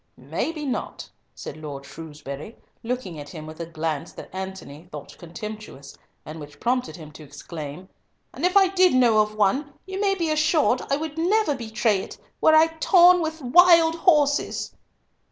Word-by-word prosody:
"May - - -3
be 305 -2 -6
not," 265 - -4 0.3
said - - -8
Lord 145 -3 -8
Shrewsbury, 150 +4 -9 0.2
looking 230 -9 -4
at 145 0 -9
him 155 0 -9
with 155 +1 -11
a 170 - -5
glance 160 -3 -4
that - - -11
Antony 190 -4 -8
thought 150 -2 -9
contemptuous, 175 -5 -9 0.3
and 155 +1 -8
which 145 -1 -12
prompted 250 +1 -1
him 155 -4 -11
to 155 - -13
exclaim, 150 +3 -9 0.5
"And - - -8
if 360 +2 +3
I 385 -2 +5
did 370 -5 +3
know 235 -4 +4
of 215 0 +1
one, 240 +8 +1
you 380 +1 -5
may 395 -1 +2
be 335 -4 -1
assured 310 -4 +2
I 275 - +2
would 315 0 -5
never 375 -1 +2
betray 220 -4 0
it - - -8 0.2
were 315 - +6
I 315 +1 +7
torn 360 +1 +6
with 320 0 -4
wild 335 +4 +6
horses." 300 -4 +1
230 Hz, 170 wpm, -24 LUFS, -, 0.5 s, I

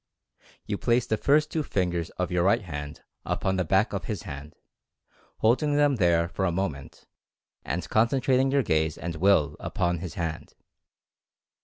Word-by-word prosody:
You 100 - -3
place 120 0 +2
the 110 - 0
first 150 +7 +2
two 155 - -1
ringers 85 -3 0
of 90 -1 -2
your 90 -1 +1
right 105 +4 +3
hand 75 -4 -7 0.2
upon 95 0 -1
the 90 - +1
back 95 +6 +2
of 95 -3 -3
his 105 0 -4
hand, 75 -4 -8 0.8
holding 145 +6 +2
them 145 -2 +3
there 85 -3 +3
for 85 +3 -4
a 90 - +1
mo 95 +3 0
ment, 70 -2 -12 0.6
and 90 - -3
concentrating 130 +3 +2
your 140 0 +2
gaze 80 -5 0
and 85 +1 -5
Will 90 -4 +3
upon 85 0 -1
his 90 -1 -7
hand. 80 -3 -5
95 Hz, 165 wpm, -26 LUFS, 85-115 Hz, 0.8 s, right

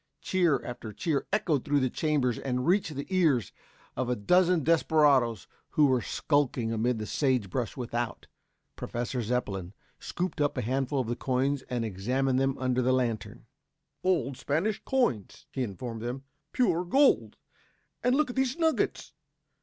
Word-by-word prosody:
Cheer 170 -8 +1
after 120 -3 -6
cheer 155 - -1
echoed 165 - +1
through 145 0 +2
the 130 - +2
chambers 140 -7 0
and 125 -1 -2
reached 175 -3 +1
the 140 - -4
ears 150 - +2 0.4
of 130 -1 -2
a 125 - +1
dozen 180 - +3
desperadoes 145 - +3 0.3
who 150 - +7
were 130 -3 +3
skulking 125 0 0
amid 115 +2 0
the 110 - -4
sage 125 -7 0
brush 125 +1 -3
without. 120 -1 -3 0.5
Professor 120 +1 -3
Zepplin 105 -6 -2 0.3
scooped 180 -3 -3
up 145 - +1
a - - -1
handful 135 +3 -1
of 120 - -5
the 120 - -1
coins 130 +2 0
and 120 -2 -1
examined 125 +6 0
them 135 0 +1
under 130 -1 0
the 130 +1 +2
lantern. 120 -4 -2 0.6
"Old 140 -9 +1
Spanish 175 +9 -1
coins," 130 - -1
he 135 - -3
informed 115 +1 -5
them. 125 +3 -4 0.3
"Pure 180 -8 +1
gold. 275 +10 +3 0.7
And 250 +1 +3
look 295 -3 +1
at - - -12
these 265 +1 0
nuggets! 325 -2 0
130 Hz, 155 wpm, -28 LUFS, 120-160 Hz, 0.7 s, who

